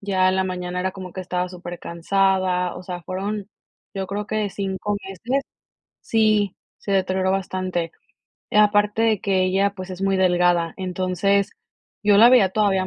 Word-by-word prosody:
ya 190 -2 +2
en 185 - +1
la 190 - +1
mañana 180 -1 -4
era 185 +1 -1
como 185 -2 -9
que 190 - -5
estaba 180 0 -2
supercansada, 180 +1 -1
o 180 - -9
sea, 180 -1 -6
fueron, 200 +4 -4 0.5
yo 190 -1 -2
creo 205 +2 -4
que 215 -1 -1
5 195 +1 -3
meses 230 +9 -2 0.6
Sí, 215 -3 +2 0.2
se 200 - -4
deterioró 190 -1 +1
bastante. 185 -3 -2 0.6
Aparte 210 +1 +3
de 220 -3 +2
que 190 -2 +1
ella, 195 +2 +1
pues 185 -1 -8
es 185 0 -7
muy 195 0 +1
delgada, 175 -2 +2
entonces, 185 +2 0 0.5
yo 205 -1 +5
la 230 +4 +8
veía 245 -7 +6
todavía 195 -1 +1
190 Hz, 160 wpm, -22 LUFS, 185-200 Hz, 0.6 s, la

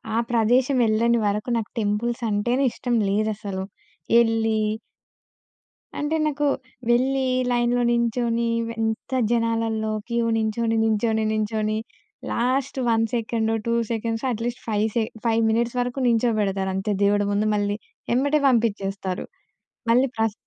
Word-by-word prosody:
ఆ - - +2
ప్రదేశం 245 +4 +3
యెళ్ళని 230 +2 +2
వరకు 210 +4 -1
నాకు 220 - -4
టెంపుల్స్ 225 +3 -1
అంటేనే 240 +6 +1
ఇష్టం 245 -1 -2
లేదసలు. 205 -2 -1 0.5
యెళ్ళి 225 -1 +3 1.4
అంటే 295 +2 -1
నాకు 295 -1 0 0.4
వెళ్లి 265 +3 +2 0.3
లైన్‌లో 240 0 +2
నించొని 235 0 +1 0.2
వె 230 - -4
ఎంత 220 +2 -2 0.2
జనాలల్లో, 225 -2 0 0.2
క్యూ 235 0 +1
నించొని, 225 +1 0
నుంచొని, 220 0 +1
నుంచొని 215 0 -1 0.5
లాస్ట్ 260 +3 0
1 225 0 +3
సెకండ్, 225 -1 0 0.2
2 230 - +1 0.2
సెకండ్స్, 225 +1 -2
అట్‌లీస్ట్ 235 +1 -3
5 215 -1 +1
సె 230 - +2 0.2
5 230 -1 +2
మినిట్స్ 235 +2 0
వరకు 245 +2 -2
నించోబెడతారు 215 -5 +1
అంతే 200 +2 -1
దేవుడు 205 0 +3
ముందు 205 +1 +1
మళ్ళీ. 205 0 0 0.4
ఎమ్మటే 285 +4 +2
పంపించేస్తారు. 200 -6 0 0.7
మళ్ళీ 250 +3 +4
ప్రస్ 220 -1 +1
225 Hz, 125 wpm, -24 LUFS, 215-240 Hz, 1.4 s, మళ్ళీ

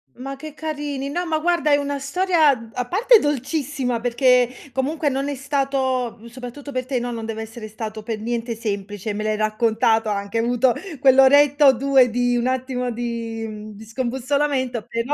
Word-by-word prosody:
Ma 270 +2 -6
che 310 +2 -9
carini! 290 -3 -4
No 350 +5 -2
ma 315 -1 +1
guarda 335 -2 +1
è - - +7
una 285 0 -2
storia 320 +1 +3
d 230 -1 -11
a 245 -1 -3
parte 450 - +5
dolcissima 275 -3 -1
perché 250 0 +3 0.2
comunque 290 +3 -1
non 275 +1 -2
è 285 - -3
stato 265 -3 -1
mhmm, 230 - -15
soprattutto 255 +4 -9
per 255 -1 -2
te, 260 -3 0
no, 245 0 -3
non 225 -1 -5
deve 220 0 -4
essere 220 0 -9
stato 215 0 -6
pe 225 0 -3
niente 230 +1 -3
semplice 205 -1 -4
me 215 +1 -3
l'hai 215 0 0
raccontato, 220 0 +1
hai 205 - 0
anche 200 +3 -3
avuto 240 +1 +2 0.3
quell'oretta 280 +2 +6
o 265 - +8
2 265 0 +4
di 245 +1 +1
un 240 +1 0
attimo 255 -1 -2
di 230 -1 -4
mhmm, 215 0 -8
di 220 +2 -11
scombussolamento, 260 +1 -1
però 230 +5 -1
250 Hz, 185 wpm, -22 LUFS, 230-280 Hz, 0.3 s, o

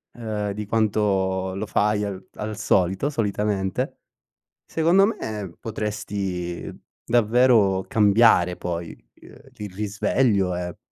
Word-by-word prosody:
ehm, 105 -3 -3
di 105 +1 -5
quanto 95 -4 0
lo 105 - -3
fai 105 0 +1
al 95 -2 -6
al 105 0 -4
solito, 95 +5 +1
solitamente. 105 -6 -1 0.7
Secondo 170 +5 +3
me 105 - -4
potresti 100 -5 -4 0.4
davvero 115 -4 +3
cambiare 100 -4 +4
poi, 85 -2 -4 0.3
ehm, - - -15 0.2
il 105 -3 -7
risveglio, 100 -1 +1
e 90 -1 -5
105 Hz, 105 wpm, -23 LUFS, 95-110 Hz, 0.7 s, cambiare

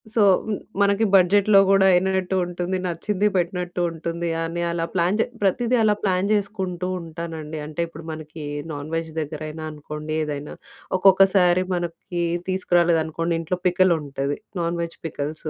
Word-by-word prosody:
So, 225 - +3 0.2
హ్మ్. 220 -1 -1 0.3
మనకి 200 +2 +3
బడ్జెట్‌లో 195 +2 +5
కూడా 195 -1 +5
అయినట్టు 190 +1 +1
ఉంటుంది. 175 +1 -3
నచ్చింది 190 +4 0
పెట్టినట్టు 180 0 -1
ఉంటుంది. 170 +1 -3
అని 165 +1 -3
అలా 170 -1 -1
ప్లాన్ 180 +2 +2
చే - - +3 0.2
ప్రతీదీ 235 +5 +2
అలా 210 -1 +4
ప్లాన్ 190 0 +1
చేసుకుంటూ 190 -3 -2
ఉంటానండి. 160 -1 -6
అంటే 155 +2 -4
ఇప్పుడు 165 -1 -11
మనకి 155 0 -8 0.3
నాన్ 145 0 -6
వెజ్ 165 0 -3
దగ్గరైనా 155 +1 -6
అనుకోండి, 150 +1 -6
ఏదైనా 150 -1 -5 0.4
ఒక్కొక్కసారి 185 -1 +5
మనకి 175 0 -4 0.3
తీసుకురాలేదనుకోండి 170 -3 +1
ఇంట్లో 175 +3 -2
పికల్ 185 0 +4
ఉంటది. 140 0 -3 0.2
Non 170 0 -1
veg 170 0 -5
pickles. 155 +1 -5
175 Hz, 140 wpm, -23 LUFS, 160-190 Hz, 0.4 s, బడ్జెట్‌లో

